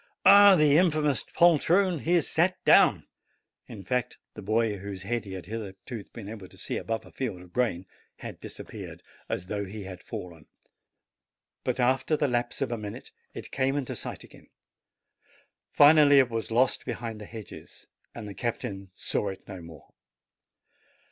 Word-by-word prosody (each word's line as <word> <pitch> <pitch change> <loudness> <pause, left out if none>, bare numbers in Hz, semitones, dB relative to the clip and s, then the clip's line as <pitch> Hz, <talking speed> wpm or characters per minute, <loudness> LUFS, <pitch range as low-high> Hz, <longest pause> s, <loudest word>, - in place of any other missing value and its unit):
"Ah, 200 -1 +9
the 150 -2 +5
infamous 155 -6 +2
poltroon! 175 +2 +3
he 170 - 0
has 170 - +2
sat 180 +3 +2
down!" - - +5 0.6
In 105 -4 -9
fact, 125 +1 -2 0.2
the 105 - -9
boy, 110 +1 0
whose 100 -1 -6
head 115 +2 -2
he 95 - -8
had 95 -4 -7
hitherto 105 +2 -7
been 110 -4 -9
able 105 -3 -8
to - - -18
see - - -4
above 115 -1 -4
a - - -15
field 115 -9 -4
of 90 0 -15
grain, 110 -8 0 0.3
had - - -9
disappeared, - - -9 0.3
as 90 - -3
though 100 +2 -3
he 100 +2 -7
had 95 -2 -9
fallen; 85 -4 -9 1.2
but, - - -2
after 130 +5 +2
the 145 - +1
lapse 120 -1 -1
of - - -4
a 120 - -3
minute, 105 -1 -8 0.2
it - - -8
came 135 0 0
into 140 -3 -3
sight - - -6
again; - - -17 1.2
finally, 145 -1 +7
it 130 -3 +4
was 115 -1 -3
lost 120 +3 +2
behind 115 -3 -5
the - - -8
hedges, 110 0 -11 0.3
and 110 -3 -7
the 100 - -7
captain 100 -4 -4
saw 105 - -2
it 95 -1 -7
no 95 -3 -8
more. 80 -3 -13
115 Hz, 170 wpm, -27 LUFS, 100-140 Hz, 1.2 s, Ah